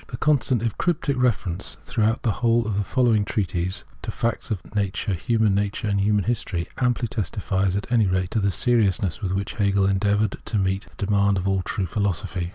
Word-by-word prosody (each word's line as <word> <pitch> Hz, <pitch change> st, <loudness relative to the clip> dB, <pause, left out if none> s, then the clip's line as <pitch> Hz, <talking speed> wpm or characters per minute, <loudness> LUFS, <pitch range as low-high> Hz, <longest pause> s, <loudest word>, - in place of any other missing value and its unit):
The 120 Hz, -, -6 dB
constant, 130 Hz, -5 st, +2 dB
if 115 Hz, -3 st, -1 dB
cryptic, 160 Hz, -5 st, 0 dB
reference 105 Hz, -8 st, -1 dB
throughout 110 Hz, 0 st, 0 dB
the 115 Hz, -, +2 dB
whole 115 Hz, +2 st, +2 dB
of 105 Hz, -2 st, -2 dB
the 105 Hz, -, +1 dB
following 115 Hz, -1 st, +2 dB
treatise 95 Hz, -4 st, -2 dB, 0.2 s
to -, -, -5 dB
facts 115 Hz, -1 st, -2 dB
of 100 Hz, -3 st, -5 dB
nature, 100 Hz, 0 st, -1 dB
human 110 Hz, +3 st, +1 dB
nature, 100 Hz, +1 st, -1 dB
and 100 Hz, -1 st, +1 dB
human 105 Hz, 0 st, +2 dB
history, 100 Hz, -7 st, -2 dB
amply 125 Hz, -1 st, +1 dB
testifies 100 Hz, -3 st, -1 dB
at 100 Hz, -, -5 dB
any 115 Hz, -4 st, +4 dB
rate 90 Hz, 0 st, 0 dB
to 110 Hz, -, +1 dB
the 100 Hz, -1 st, +2 dB
seriousness 100 Hz, -3 st, +1 dB
with 95 Hz, -, -2 dB
which 100 Hz, +1 st, -2 dB
Hegel 100 Hz, -2 st, +2 dB
endeav 100 Hz, +1 st, +2 dB
loured 110 Hz, -3 st, 0 dB
to 110 Hz, -, -2 dB
meet 95 Hz, +1 st, 0 dB
this -, -, -21 dB
demand 100 Hz, -1 st, +2 dB
of 95 Hz, +1 st, -2 dB
all 95 Hz, -1 st, +1 dB
true 95 Hz, +1 st, -2 dB
philosophy. 95 Hz, -2 st, -2 dB
100 Hz, 200 wpm, -24 LUFS, 95-115 Hz, 0.2 s, any